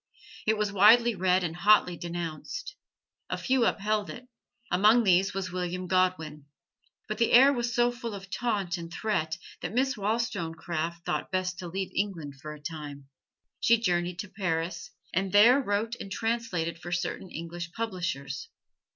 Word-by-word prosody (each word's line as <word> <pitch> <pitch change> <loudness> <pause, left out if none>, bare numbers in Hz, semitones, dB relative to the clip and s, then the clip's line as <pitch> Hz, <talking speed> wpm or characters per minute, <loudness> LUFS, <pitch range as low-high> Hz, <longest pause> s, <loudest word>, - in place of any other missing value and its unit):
It 220 0 +3
was 210 -1 0
widely 230 +4 +6
read 185 -1 +2
and 165 -2 -3
hotly 195 -1 +4
denounced. 170 - -5 0.5
A - - -2
few 260 -3 +2
upheld 210 0 0
it: 245 +1 -9 0.4
among 215 +6 +5
these 190 0 +3
was 190 -2 -3
William 180 0 -3
Godwin. 180 -5 0 0.6
But - - -4
the 230 - +3
air 270 +4 +8
was 240 -2 -2
so 240 0 +3
full 235 -3 -6
of 190 -1 -10
taunt 200 -7 -1
and 170 -1 -8
threat 175 -5 -1 0.2
that 175 +5 -4
Miss 265 +2 +2
Wollstonecraft 170 -6 -2
thought - - -2
best 185 -1 -1
to 180 - -5
leave 190 +2 -4
England 165 -9 -3
for 150 - -6
a 150 - -9
time. 145 -3 -7 0.5
She 235 - +5
journeyed 175 -5 0
to 205 - -9
Paris, 175 -2 -3 0.2
and 190 +2 0
there 235 +8 +7
wrote 220 -1 -1
and 195 - -7
translated 210 -7 -2
for 175 +1 -8
certain 180 +1 -3
English 170 +1 -6
publishers. 175 - -4
185 Hz, 160 wpm, -28 LUFS, 170-220 Hz, 0.6 s, air